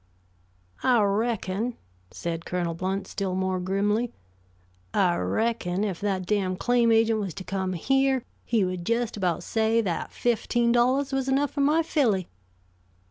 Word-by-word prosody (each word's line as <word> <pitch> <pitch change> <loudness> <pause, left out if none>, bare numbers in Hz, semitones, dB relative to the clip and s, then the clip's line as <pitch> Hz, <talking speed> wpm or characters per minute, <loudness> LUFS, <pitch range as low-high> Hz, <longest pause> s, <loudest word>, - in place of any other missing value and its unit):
"I 250 -3 +4
reckon," 215 +1 -1 0.3
said 165 -1 -4
Colonel 175 -1 -2
Blount, 190 +3 -2
still 195 -2 -3
more 190 0 0
grimly; 205 +5 0 0.8
"I 180 -3 +3
reckon 190 - 0
if 195 -5 -3
that 195 -3 -1
damned 185 -2 0
claim 240 0 +3
agent 225 0 +3
was 195 -6 -4
to 190 - -6
come 190 -1 -2
here, 270 +7 +1 0.2
he 225 -5 +1
would 180 -1 -3
just 230 +3 0
about 180 -4 -1
say 225 +2 +1
that 180 -6 -3
fifteen 240 0 +1
dollars 260 +3 +2
was 270 0 0
enough 275 +2 +2
for 285 - -2
my 305 +4 +3
filly." 230 - +1
210 Hz, 145 wpm, -26 LUFS, 185-240 Hz, 0.8 s, I